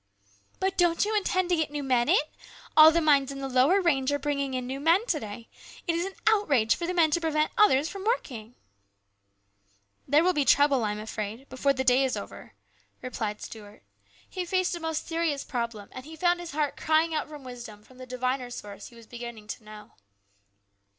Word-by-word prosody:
" 100 0 -35
But 380 0 -1
don't 345 +1 +3
you 430 +1 -1
intend 370 -3 0
to 355 - +3
get 315 -2 -1
new 290 0 -4
men 250 -3 +1
in? - - +6 0.6
All 310 0 +10
the 335 +1 +2
mines 280 -3 +3
in 275 - -7
the 275 0 -4
lower 265 +9 +3
range 285 -7 +1
are 285 - +1
bringing 280 -2 -2
in 255 -1 -3
new 265 +2 -5
men 335 +9 +3
to 325 -10 0
day. 220 0 -8 0.4
It 340 - 0
is 340 +3 -1
an 390 - -9
outrage 300 - +3
for 340 - -4
the 360 - -2
men 325 -3 +4
to 340 - +1
prevent 310 -1 0
others 305 -9 +4
from 390 +2 -7
working! 245 - -3 0.5
" 100 0 -47
" 100 0 -42
There 295 +4 +4
will 365 +1 +3
be 295 -3 +1
trouble, 280 -2 +4
I 210 - 0
am - - -6
afraid, 215 +4 -6
before 275 +2 +1
the 260 -1 -2
day 255 +1 +4
is 265 - -1
over," - - -10 0.5
replied 220 -4 -4
Stuart. 210 -2 -11 0.4
He 370 - -4
faced 370 +1 0
a 345 - -4
most 320 -1 -3
serious 325 -4 -1
problem, 235 -5 -4
and 255 - -9
he 315 +3 -11
found 350 +2 +1
his 350 -1 -7
heart 295 -1 -1
crying 320 +1 +2
out 310 - -2
for 300 - -8
wisdom 240 -6 -10
from 255 +3 -19
the 255 - -9
diviner 255 0 -2
source 205 -4 -9
he 240 - -16
was 230 -1 -14
beginning 235 -2 -9
to 225 - -6
know. 215 0 -12
275 Hz, 215 wpm, -27 LUFS, 235-330 Hz, 0.6 s, All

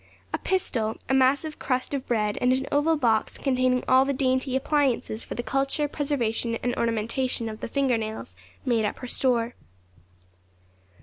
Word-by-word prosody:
A - - 0
pistol, 235 -13 0
a - - +2
massive 275 +4 +2
crust 255 +1 -1
of 275 -2 -3
bread, 210 -3 +1
and 250 - +3
an 260 +1 +1
oval 290 +3 +3
box 225 -6 +1
containing 255 -2 +1
all 260 +1 +6
the 280 +1 0
dainty 260 0 0
appliances 265 -5 0
for - - -7
the 240 - -3
culture, 275 +5 0
preservation, 245 -6 -1
and 245 0 0
ornamentation 230 +2 0
of 215 0 -6
the - - -4
finger 255 -1 +1
nails, 215 - -6 0.3
made 235 -3 +2
up 210 - -1
her 250 - -7
store. 240 -2 +1
255 Hz, 165 wpm, -26 LUFS, 230-275 Hz, 0.3 s, all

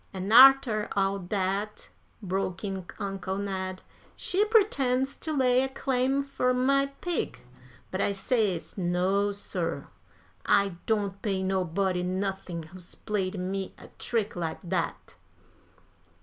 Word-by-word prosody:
"An' 190 +2 -4
arter 255 -4 +7
all 195 0 +1
dat," 195 +2 -2 0.3
broke 190 0 -2
in 190 -3 -4
Uncle 195 -1 -3
Ned, 190 -2 -4 0.3
"she 385 +3 +1
pretends 275 - +2
to 315 - -4
lay 255 -3 +3
a 265 - -1
claim 265 +1 0
fur 255 -2 0
my 275 +2 +3
pig. 350 -2 -2 0.5
But 190 - -1
I - - +2
says 200 -3 -1
no, 185 +3 +1
sir; 200 - -4 0.5
I 200 0 +3 0.2
don't 205 -3 0
pay 195 -3 -1
nobody 185 0 0
nothin' 185 -2 -3
who's 175 +2 -11
played 200 -2 -2
me 190 +1 -3
a - - -13
trick 220 -3 -1
like 170 +1 -4
dat." - - -2
200 Hz, 125 wpm, -28 LUFS, 185-250 Hz, 0.5 s, arter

